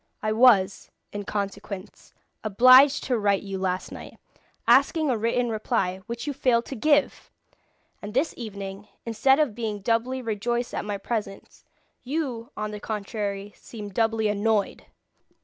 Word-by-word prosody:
I 215 Hz, -, 0 dB
was, 215 Hz, -4 st, +4 dB, 0.2 s
in 205 Hz, 0 st, -5 dB
consequence, 200 Hz, -1 st, -6 dB, 0.3 s
obliged 255 Hz, +7 st, +6 dB
to 250 Hz, -3 st, 0 dB
write 200 Hz, -2 st, +1 dB
you 195 Hz, -1 st, -5 dB
last 185 Hz, -1 st, -2 dB
night, -, -, -10 dB, 0.5 s
asking 310 Hz, -4 st, +4 dB
a -, -, +1 dB
written 235 Hz, +2 st, 0 dB
reply, 215 Hz, -4 st, -1 dB
which 235 Hz, +1 st, -5 dB
you 290 Hz, -, -2 dB
failed 250 Hz, -3 st, +2 dB
to 270 Hz, -, -6 dB
give! 290 Hz, +4 st, +1 dB, 0.7 s
And 210 Hz, +2 st, -8 dB
this 285 Hz, +5 st, +1 dB
evening, 200 Hz, -3 st, -7 dB, 0.2 s
instead 235 Hz, +4 st, +3 dB
of 295 Hz, -8 st, +1 dB
being 220 Hz, -2 st, -4 dB
doubly 240 Hz, +5 st, 0 dB
rejoiced 235 Hz, +2 st, -2 dB
at -, -, -3 dB
my 205 Hz, -1 st, -3 dB
presence, 205 Hz, -1 st, -5 dB, 0.4 s
you, 255 Hz, -4 st, -3 dB
on 210 Hz, 0 st, -3 dB
the 210 Hz, -, -6 dB
contrary, 205 Hz, -1 st, -4 dB
seem 210 Hz, -3 st, -9 dB
doubly 225 Hz, +1 st, +1 dB
annoyed! 210 Hz, 0 st, 0 dB
220 Hz, 145 wpm, -25 LUFS, 205-245 Hz, 0.7 s, obliged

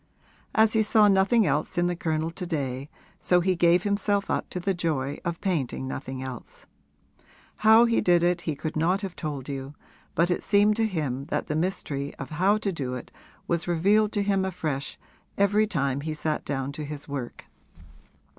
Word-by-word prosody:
As 220 Hz, 0 st, +5 dB
he 220 Hz, -, +4 dB
saw 215 Hz, 0 st, +5 dB
nothing 195 Hz, +3 st, +4 dB
else 155 Hz, +3 st, -1 dB
in 175 Hz, -, +3 dB
the 175 Hz, 0 st, 0 dB
Colonel 160 Hz, -1 st, -1 dB
to 180 Hz, +2 st, -6 dB
day, 140 Hz, -4 st, -3 dB, 0.3 s
so 180 Hz, -, +3 dB
he 185 Hz, +1 st, +1 dB
gave 175 Hz, +1 st, +4 dB
himself 200 Hz, 0 st, 0 dB
up -, -, -1 dB
to 180 Hz, -, -4 dB
the 195 Hz, +2 st, 0 dB
joy 150 Hz, -5 st, -2 dB
of 170 Hz, -1 st, -3 dB
painting 145 Hz, -, -1 dB
nothing 130 Hz, 0 st, -5 dB
else. 130 Hz, -3 st, -9 dB, 0.9 s
How 220 Hz, +2 st, +6 dB
he 230 Hz, -1 st, +2 dB
did 175 Hz, -3 st, +3 dB
it 175 Hz, 0 st, +2 dB
he 160 Hz, -3 st, -2 dB
could 155 Hz, +2 st, -5 dB
not 175 Hz, +5 st, +1 dB
have 195 Hz, -3 st, -5 dB
told 145 Hz, -5 st, -5 dB
you, 140 Hz, 0 st, -6 dB, 0.4 s
but 170 Hz, +2 st, +2 dB
it 175 Hz, -, 0 dB
seemed 205 Hz, +1 st, +3 dB
to 225 Hz, -1 st, +2 dB
him 140 Hz, -8 st, -3 dB
that 165 Hz, -, -2 dB
the 150 Hz, -, 0 dB
mystery 155 Hz, -5 st, -2 dB
of 135 Hz, -, -8 dB
how 190 Hz, +7 st, +3 dB
to 210 Hz, -2 st, -1 dB
do 130 Hz, -7 st, -3 dB
it 125 Hz, -, -8 dB, 0.4 s
was 170 Hz, -1 st, -1 dB
revealed 200 Hz, +5 st, +3 dB
to 205 Hz, -2 st, +1 dB
him 195 Hz, -1 st, +1 dB
afresh 155 Hz, -7 st, -3 dB, 0.4 s
every 205 Hz, +2 st, +3 dB
time 140 Hz, -7 st, -1 dB
he 155 Hz, +1 st, -3 dB
sat 155 Hz, 0 st, -2 dB
down 135 Hz, -1 st, -3 dB
to 150 Hz, +2 st, -6 dB
his 150 Hz, -1 st, -6 dB
work. 135 Hz, -4 st, -6 dB
170 Hz, 190 wpm, -26 LUFS, 145-195 Hz, 0.9 s, How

